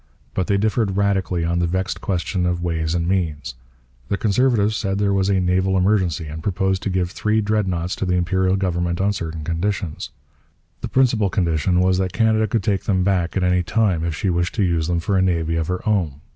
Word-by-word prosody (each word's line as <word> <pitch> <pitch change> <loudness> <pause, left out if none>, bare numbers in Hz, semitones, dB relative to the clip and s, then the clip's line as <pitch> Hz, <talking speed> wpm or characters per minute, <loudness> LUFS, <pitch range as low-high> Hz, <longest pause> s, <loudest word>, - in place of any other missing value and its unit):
But 95 - -1
they 100 - +2
differed 105 -1 0
radically 95 -4 0
on 85 +1 0
the 85 - +1
vexed 95 +2 -2
question 90 -1 -1
of 90 0 -1
ways 80 -1 -1
and 85 -1 -1
means. 80 -9 -1 0.5
The 100 - -1
Conservatives 110 -1 +2
said 95 -2 -1
there 100 -1 +1
was 95 0 +1
a 95 -1 +2
naval 95 +1 +1
emergency 90 -4 +1
and 80 +1 -7
proposed 95 +1 0
to - - -2
give 90 -1 -1
three 110 +1 0
Dreadnoughts 95 -5 -1
to - - -2
the 90 - +1
Imperial 95 +1 +1
government 85 -2 -1
on 100 +2 +1
certain 80 -4 -5
conditions. 85 0 -3 0.7
The - - -3
principal 120 -6 +2
condition 90 0 +1
was 95 0 +2
that 95 -1 -1
Canada 110 +1 +2
could 110 0 -1
take 100 -2 -1
them 95 -3 +1
back 90 -2 0
at 95 - +1
any 90 0 +2
time 95 -3 +1
if 85 -2 -2
she 95 +3 -1
wished 85 0 -1
to 105 - +1
use 85 -3 0
them 85 -1 0
for 95 +3 0
a - - +3
navy 85 -3 0
of 80 -1 -1
her 90 +5 -3
own. 95 -9 +1
95 Hz, 215 wpm, -21 LUFS, 85-100 Hz, 0.7 s, a